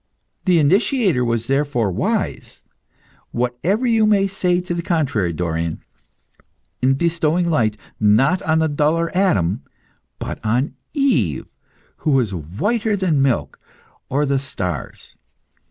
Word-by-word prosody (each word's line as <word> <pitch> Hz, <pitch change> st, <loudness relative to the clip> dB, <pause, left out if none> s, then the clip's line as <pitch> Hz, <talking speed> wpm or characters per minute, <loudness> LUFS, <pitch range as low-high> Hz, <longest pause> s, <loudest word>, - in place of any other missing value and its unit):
The 180 Hz, -2 st, +4 dB
initiator 190 Hz, -, +2 dB
was 115 Hz, -1 st, -1 dB
therefore 135 Hz, -6 st, 0 dB
wise -, -, -2 dB, 0.7 s
whatever 125 Hz, -, -1 dB
you 225 Hz, -3 st, +3 dB
may 200 Hz, -2 st, +4 dB
say 180 Hz, -2 st, 0 dB
to 180 Hz, -1 st, -4 dB
the 170 Hz, -, -2 dB
contrary, 140 Hz, -, 0 dB
Dorion 80 Hz, -1 st, -2 dB, 1.0 s
in 130 Hz, +1 st, +3 dB
bestowing 170 Hz, +2 st, +1 dB
light, 110 Hz, -9 st, +1 dB, 0.2 s
not 115 Hz, -, +3 dB
on 160 Hz, 0 st, +1 dB
the 160 Hz, 0 st, +2 dB
duller 160 Hz, +3 st, 0 dB
Adam, 110 Hz, -, +2 dB, 0.6 s
but -, -, -6 dB
on 120 Hz, +7 st, 0 dB, 0.2 s
Eve, 135 Hz, -, +1 dB, 0.5 s
who -, -, -2 dB
was 120 Hz, -7 st, +2 dB
whiter 205 Hz, -, -1 dB
than 170 Hz, -7 st, +1 dB
milk 135 Hz, -3 st, 0 dB, 0.5 s
or 145 Hz, +3 st, +1 dB
the 140 Hz, -1 st, +1 dB
stars. 90 Hz, -, -5 dB
145 Hz, 120 wpm, -20 LUFS, 115-180 Hz, 1.0 s, The